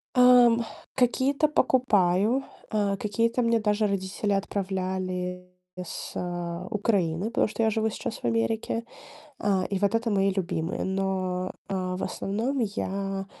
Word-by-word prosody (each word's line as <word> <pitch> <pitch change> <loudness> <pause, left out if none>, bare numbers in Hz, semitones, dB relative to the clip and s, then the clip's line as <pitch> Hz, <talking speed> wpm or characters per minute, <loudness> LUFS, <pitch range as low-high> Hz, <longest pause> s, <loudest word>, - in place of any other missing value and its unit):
Ам, 245 -2 +7 0.3
какие-то 270 +4 +2
покупаю, 240 -4 +3 0.3
э, 205 -2 +1
какие-то 230 +4 0
мне 230 0 +3
даже 210 0 +1
родители 200 +1 -1
отправляли 185 -2 -2 0.3
с, 180 -1 -6
э, 175 0 -4
Украины, 195 -5 +1
потому 230 +1 +1
что 225 +1 -2
я 220 - +4
живу 220 +1 +1
сейчас 220 - -5
в - - -8
Америке. 120 - 0 0.6
А, 190 -2 +1
и 195 - 0
вот 200 +2 +2
это 230 0 0
мои 195 -1 +2
любимые. 175 -4 -2
Но, 190 -1 -1 0.2
э, 185 -1 -2
в - - -4
основном 230 +8 -2
я, 195 -2 -2
200 Hz, 135 wpm, -27 LUFS, 185-230 Hz, 0.6 s, Ам